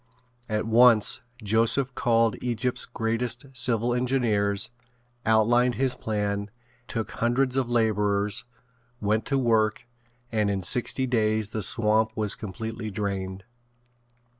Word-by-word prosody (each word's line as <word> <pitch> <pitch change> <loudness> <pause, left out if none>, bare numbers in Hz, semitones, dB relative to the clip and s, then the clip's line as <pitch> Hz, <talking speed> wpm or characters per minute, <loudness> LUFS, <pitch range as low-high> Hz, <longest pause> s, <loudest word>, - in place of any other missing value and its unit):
At 105 0 -1
once 115 -1 +5 0.2
Joseph 115 +5 +2
called 115 -2 +2
Egypt's 125 0 -1
greatest 115 +2 -2
civil 120 -1 +1
engineers, 115 -5 +1 0.6
outlined 120 +3 +3
his 130 -1 +1
plan, 105 -3 -3 0.4
took 115 -2 -4
hundreds 125 +2 0
of 130 -3 0
laborers, 105 -3 +1 0.6
went 110 +2 0
to 140 - +1
work 110 -4 +1 0.5
and 105 -2 +1
in 95 -2 -2
sixty 125 +6 +1
days 110 -3 0
the 110 - -3
swamp 110 +2 +2
was 105 -2 +2
completely 110 +2 -6
drained. 95 -2 -4
110 Hz, 115 wpm, -26 LUFS, 105-120 Hz, 0.6 s, once